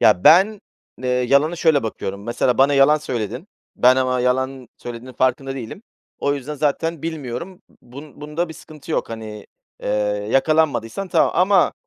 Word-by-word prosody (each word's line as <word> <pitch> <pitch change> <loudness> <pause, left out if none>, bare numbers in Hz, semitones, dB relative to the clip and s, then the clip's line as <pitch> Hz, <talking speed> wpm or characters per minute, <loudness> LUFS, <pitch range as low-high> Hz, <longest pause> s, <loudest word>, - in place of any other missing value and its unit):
Ya 95 -4 +4
ben, 195 +5 +6 0.4
eee, 130 - -2
yalana 140 +6 +2
şöyle 160 -4 +3
bakıyorum, 100 -3 -5
mesela 120 +1 0
bana 140 +2 +4
yalan 140 +2 +5
söyledin. 125 - -5 0.3
Ben 125 +1 +5
ama 130 -1 +1
yalan 130 +1 -1
söylediğinin 120 +1 -9
farkında 130 +1 0
değilim. 130 - -8 0.4
O 140 0 0
yüzden 145 +2 -6
zaten 155 +2 -1
bilmiyorum, 160 +2 -6 0.2
bun 140 +4 -13
bunda 150 +3 -3
bir 160 - -9
sıkıntı 155 0 -13
yok. - - -1
Hani, 110 -2 -8 0.4
eee, - - -3 0.4
yakalanmadıysan 155 - +1
tamam. - - +3
Ama 185 +1 +3
135 Hz, 150 wpm, -21 LUFS, 125-155 Hz, 0.4 s, ben